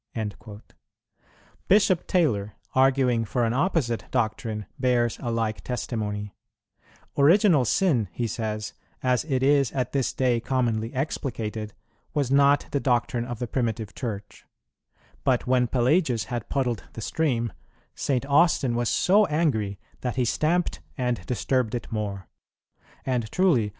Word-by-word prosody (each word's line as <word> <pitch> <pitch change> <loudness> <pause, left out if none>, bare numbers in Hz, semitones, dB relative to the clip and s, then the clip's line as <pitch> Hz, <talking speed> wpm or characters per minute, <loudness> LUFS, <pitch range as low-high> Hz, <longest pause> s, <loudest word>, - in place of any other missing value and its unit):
"[22:1] 105 -1 -6 1.1
Bishop 195 -3 +3
Taylor, 105 - +1 0.2
arguing 130 -3 +3
for 120 +2 0
an 115 - 0
opposite 135 -6 0
doctrine, 110 -3 -1
bears 120 -3 +1
a 120 - -3
like 115 -2 -1
testimony: 105 -4 -3 0.9
"Original 165 - +5
Sin," 125 - +2
he 120 - -2
says, 110 -2 -3 0.3
"as 125 -1 +2
it 130 -4 0
is 140 -2 +4
at 130 -3 -1
this 135 -3 0
day 125 -3 +1
commonly 115 -3 -1
explicated, 110 -6 -3 0.4
was 140 -4 0
not 140 +1 +4
the 140 - +1
doctrine 120 -2 0
of 120 -1 -5
the 125 - -3
primitive 115 -4 -2
Church; 105 -5 -6 0.8
but 130 -2 +2
when 125 -1 +3
Pelagius 125 - +2
had 120 -3 -5
puddled 125 -5 -1
the 115 - -7
stream, 115 - -1 0.4
St. 135 -1 -1
Austin 140 -3 +3
was 120 -1 0
so 205 - +4
angry 130 -11 0 0.2
that 125 -2 -3
he 130 -2 +1
stamped 165 +8 0 0.2
and 125 -7 -1
disturbed 125 -1 0
it 120 - -6
more. 100 -4 -3 0.8
And 125 -4 -1
truly 160 - +3
125 Hz, 135 wpm, -25 LUFS, 110-140 Hz, 1.1 s, Original